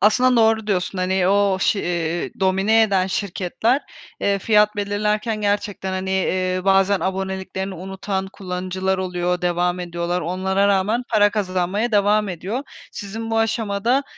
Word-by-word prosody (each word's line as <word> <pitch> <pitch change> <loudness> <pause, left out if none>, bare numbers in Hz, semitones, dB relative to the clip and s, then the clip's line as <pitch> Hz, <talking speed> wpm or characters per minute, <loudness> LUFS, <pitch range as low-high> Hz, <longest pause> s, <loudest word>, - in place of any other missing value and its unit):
Aslında 250 +4 +4
doğru 220 -1 +3
diyorsun, 190 -2 -1
hani, 185 0 +1
o 200 -1 +3
ş 200 - +2
iii, 170 -1 -2
domine 195 +4 +3
eden 195 -4 +2
şirketler, 200 +7 -1 0.4
eee, 200 0 +1
fiyat 210 +1 +3
belirlerken 210 +2 -1
gerçekten, 205 -2 -1
hani, 190 0 -3
eee, 185 -1 0
bazen 195 0 +3
aboneliklerini 190 0 -3
unutan 190 +2 -4
kullanıcılar 185 0 -3
oluyor, 180 -1 -1
devam 175 0 0
ediyorlar. 175 0 -2
Onlara 190 +3 0
rağmen 200 +5 +1
para 205 -2 +4
kazanmaya 200 +2 -1
devam 210 +1 +3
ediyor. 195 - -4 0.3
Sizin 225 +3 -6
bu 225 - +1
aşamada, 225 +3 +1
195 Hz, 135 wpm, -21 LUFS, 185-210 Hz, 0.4 s, Aslında